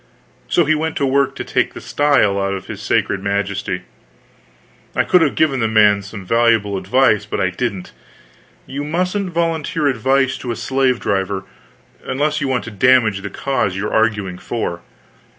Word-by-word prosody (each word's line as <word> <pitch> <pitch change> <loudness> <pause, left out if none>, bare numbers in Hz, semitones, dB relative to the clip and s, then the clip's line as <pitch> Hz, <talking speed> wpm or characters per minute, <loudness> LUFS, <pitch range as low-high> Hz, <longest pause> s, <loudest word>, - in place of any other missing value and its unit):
So 175 - +2
he 155 - +3
went 160 +1 -2
to 140 - 0
work 140 +1 +1
to - - -4
take - - -1
the - - -6
style 140 -9 +2
out 100 0 -1
of 95 - -7
his - - -8
sacred 95 - 0
majesty. 100 -2 -2 1.1
I - - +3
could 180 - +4
have 155 -4 +2
given 140 -4 +2
the 115 - +1
man 105 -2 +4
some 100 -1 -9
valuable 115 -2 +2
advice, 105 +4 +2
but - - -3
I 95 - +1
didn't; 100 -2 -4 0.7
you 140 +2 -5
mustn't 180 +5 -1
volunteer 165 -3 -1
advice 135 +1 +1
to 125 - -6
a - - -3
slave 130 -1 0
driver 95 -1 -1 0.6
unless 150 +3 -1
you 140 - 0
want 130 -2 0
to 115 - -8
damage 110 -2 +3
the 100 - -5
cause 100 -4 -1
you 100 +2 -3
are - - -7
arguing 105 -5 0
for. 85 -7 -4
120 Hz, 175 wpm, -18 LUFS, 100-140 Hz, 1.1 s, could